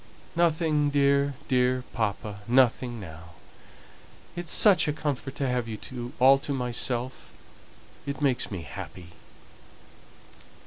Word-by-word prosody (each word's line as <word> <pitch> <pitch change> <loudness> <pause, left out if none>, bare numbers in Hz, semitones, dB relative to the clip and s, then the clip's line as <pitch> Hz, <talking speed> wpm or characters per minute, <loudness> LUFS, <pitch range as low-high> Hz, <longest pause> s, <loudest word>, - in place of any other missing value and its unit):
"Nothing, 160 -3 +2
dear, 140 0 +2
dear 125 -1 +2
papa 105 -2 -3
nothing 125 -1 +2
now. 80 -3 -11 1.0
It 175 - -5
is - - -5
such 200 -7 +6
a 150 - +1
comfort 145 -3 -4
to 135 - -1
have 125 -2 -1
you 120 +2 -7
all 135 +2 +6
to 145 +1 -5
myself 125 0 -2 0.8
it 140 -1 -4
makes 135 -4 +1
me 95 -5 -5
happy." 90 +2 -9
130 Hz, 120 wpm, -27 LUFS, 120-145 Hz, 1.0 s, such